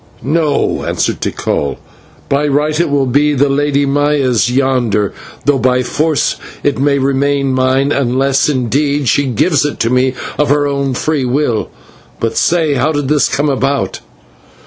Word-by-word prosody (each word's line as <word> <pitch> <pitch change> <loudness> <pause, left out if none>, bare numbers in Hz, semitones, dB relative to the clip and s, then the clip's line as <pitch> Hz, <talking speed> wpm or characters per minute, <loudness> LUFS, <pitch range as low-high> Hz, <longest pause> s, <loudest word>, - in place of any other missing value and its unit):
"No," 150 +2 0
answered - - -2
Tikal, 70 -1 -2 0.5
"by 145 +2 +1
right 150 +2 0
it 170 - +1
will 140 -1 +1
be 145 +3 +2
the 140 +1 +2
Lady 145 0 +1
Maya's 140 -4 +1
yonder, 125 -7 0 0.3
though 145 -1 +2
by 125 0 +2
force 150 +2 0 0.3
it 145 -2 0
may 140 0 +2
remain 140 0 0
mine, 130 +2 +1
unless, 135 +1 +1
indeed, 140 +2 0
she 140 +4 +2
gives 140 - +1
it 145 - -3
to 115 - +1
me 130 +1 +1 0.2
of 150 - +2
her 145 0 +2
own 140 -2 -1
free 155 +1 -1
will. 125 -4 0 0.5
But 115 - -2
say, 165 -3 +2
how 140 +3 +1
did 145 -3 -2
this 150 -1 +2
come 145 +2 0
about?" 140 0 -1
140 Hz, 155 wpm, -14 LUFS, 130-145 Hz, 0.5 s, be